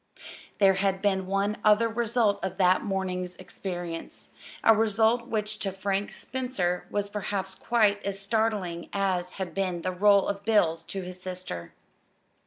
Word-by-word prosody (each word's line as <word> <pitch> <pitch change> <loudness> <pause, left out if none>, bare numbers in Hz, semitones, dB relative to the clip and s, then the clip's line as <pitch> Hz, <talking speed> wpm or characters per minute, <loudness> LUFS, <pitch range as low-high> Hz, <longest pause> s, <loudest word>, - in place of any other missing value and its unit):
There 195 -2 +6
had 195 -1 +1
been 190 -2 0
one 200 +2 0
other 215 +2 +5
result 225 -2 +1
of 190 -1 -3
that 185 -1 +4
morning's 185 -3 -2
experience 175 -2 -6 0.3
a 225 - +7
result 225 +2 +2
which 215 -2 -2
to 195 0 -1
Frank 195 +1 -2
Spencer 245 -9 -2
was 205 -1 -1
perhaps 200 -2 -3
quite 210 -2 +2
as 200 0 -3
startling 200 -5 -1
as 185 -2 0
had 190 -2 -5
been 185 -3 -2
the 185 - 0
roll 200 +2 +4
of 200 0 -3
bills 180 -7 +3
to 195 -1 -4
his 180 0 -9
sister. 180 - -6
195 Hz, 150 wpm, -27 LUFS, 185-210 Hz, 0.3 s, a